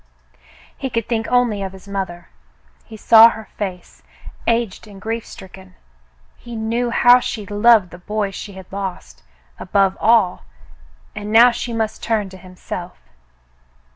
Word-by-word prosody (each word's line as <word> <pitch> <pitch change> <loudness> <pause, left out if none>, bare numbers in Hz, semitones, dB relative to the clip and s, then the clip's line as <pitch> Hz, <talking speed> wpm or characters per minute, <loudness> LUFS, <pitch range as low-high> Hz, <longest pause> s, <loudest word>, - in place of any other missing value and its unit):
He 270 - -4
could 230 -3 -2
think 225 -1 -2
only 245 -5 +1
of 190 -1 -5
his 190 +1 -14
mother. 190 -3 -5 0.6
He 220 - -11
saw 225 +1 +8
her 220 -1 -9
face, 185 -3 -6 0.5
aged 230 -3 -1
and 200 -2 -13
grief 225 +2 -4
stricken. 190 -1 -13 0.6
He 240 -1 -10
knew 230 +2 -1
how 245 +1 +6
she 215 -4 -5
loved 205 -1 +3
the 175 - -11
boy 210 +2 -3
she 200 +1 -8
had 190 -1 -11
lost, 190 - -6 0.4
above 195 0 +1
all, 220 - +3 0.7
and 205 0 -6
now 235 +3 +7
she 235 0 -5
must 220 -1 -3
turn 215 -4 -1
to 190 - -12
himself. 180 -1 -9
210 Hz, 145 wpm, -19 LUFS, 190-230 Hz, 0.7 s, saw